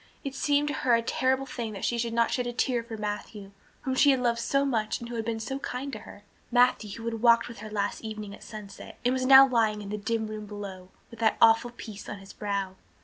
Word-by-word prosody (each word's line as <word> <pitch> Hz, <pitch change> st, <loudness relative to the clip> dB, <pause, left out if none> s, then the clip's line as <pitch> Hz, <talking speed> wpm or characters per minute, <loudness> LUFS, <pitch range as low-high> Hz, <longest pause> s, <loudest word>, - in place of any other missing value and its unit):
It 275 Hz, -, -4 dB
seemed 290 Hz, +1 st, +1 dB
to -, -, -2 dB
her 245 Hz, -4 st, +3 dB
a 230 Hz, -, 0 dB
terrible 260 Hz, +3 st, +1 dB
thing 235 Hz, -4 st, -5 dB
that 195 Hz, -, -4 dB
she 235 Hz, -, 0 dB
could 235 Hz, 0 st, -1 dB
not 230 Hz, 0 st, +2 dB
shed 250 Hz, -1 st, -1 dB
a 240 Hz, -, -3 dB
tear 245 Hz, 0 st, +1 dB
for 230 Hz, -1 st, -7 dB
Matthew, 205 Hz, -1 st, -5 dB, 0.3 s
whom 260 Hz, -, -2 dB
she 285 Hz, +2 st, +5 dB
had 265 Hz, -2 st, +4 dB
loved 235 Hz, -1 st, +1 dB
so 275 Hz, +4 st, +1 dB
much 225 Hz, -5 st, -1 dB
and 235 Hz, -, -7 dB
who 240 Hz, -, -5 dB
had 225 Hz, -, -2 dB
been 225 Hz, -1 st, -2 dB
so 265 Hz, +5 st, -4 dB
kind 270 Hz, +1 st, -5 dB
to 215 Hz, -, -5 dB
her, 205 Hz, -, -13 dB, 0.3 s
Matthew 245 Hz, -3 st, +3 dB
who 230 Hz, -, -8 dB
had 225 Hz, -1 st, -3 dB
walked 235 Hz, -1 st, +5 dB
with 235 Hz, -4 st, -10 dB
her 215 Hz, +1 st, -8 dB
last 205 Hz, -1 st, -2 dB
evening 215 Hz, -2 st, -6 dB
at -, -, -12 dB
sunset 210 Hz, -2 st, -10 dB
and 250 Hz, -, +3 dB
was 255 Hz, 0 st, 0 dB
now 270 Hz, 0 st, +10 dB
lying 225 Hz, -4 st, +1 dB
in 200 Hz, -1 st, -7 dB
the 210 Hz, +1 st, -3 dB
dim 220 Hz, +1 st, -1 dB
room 215 Hz, -1 st, -6 dB
below 195 Hz, -3 st, -8 dB, 0.2 s
with 230 Hz, -, -12 dB
that 220 Hz, -1 st, +2 dB
awful 225 Hz, +1 st, +5 dB
peace 220 Hz, -4 st, -9 dB
on 205 Hz, -, -5 dB
his 195 Hz, 0 st, -13 dB
brow. 200 Hz, -2 st, -3 dB
230 Hz, 260 wpm, -28 LUFS, 210-250 Hz, 0.3 s, now